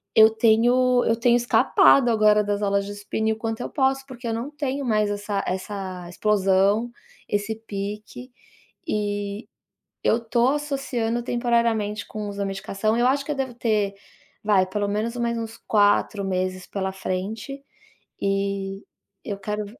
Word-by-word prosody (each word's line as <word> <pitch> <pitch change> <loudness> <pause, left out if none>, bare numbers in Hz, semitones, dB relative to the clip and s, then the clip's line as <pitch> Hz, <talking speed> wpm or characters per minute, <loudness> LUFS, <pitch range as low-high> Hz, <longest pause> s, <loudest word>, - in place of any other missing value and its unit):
eu 220 0 +8
tenho 240 +3 +3
eu 230 - +3
tenho 235 +1 +3
escapado 240 +1 +4
agora 215 -2 +4
das 205 0 -1
aulas 200 0 +1
de - - -5
spinning 220 +2 -1
o - - -6
quanto 225 0 -3
eu - - -4
posso, 270 -1 +1
porque 250 -2 -8
eu 225 - -1
não 235 +5 -3
tenho 285 -2 -3
mais 215 -4 +1
essa 205 -1 -2
essa 185 -1 -4
explosão, 200 +3 +2 0.4
esse 205 +1 -1
pique 210 +3 -7 0.6
e 205 0 -2 0.6
eu 225 - +3
tô 235 +1 +2
associando 270 -5 -2
temporariamente 235 -3 0
com 210 -1 -5
o - - -4
uso 200 0 -7
da 200 - 0
medicação, 195 +3 -1
eu 240 +1 +3
acho 275 +2 +2
que 295 - -2
deve 265 -3 -3
ter 215 -4 0 0.5
vai, 200 -3 +4
pelo 205 +2 -2
menos 215 +4 -2
mais 235 -1 -1
uns 225 0 -6
4 205 -1 +2
meses 185 -1 -2
pela 190 -1 -3
frente, 215 +9 -5 0.6
e 195 0 -1 0.4
eu 200 - -4
quero 210 +1 -3
215 Hz, 155 wpm, -24 LUFS, 200-235 Hz, 0.6 s, eu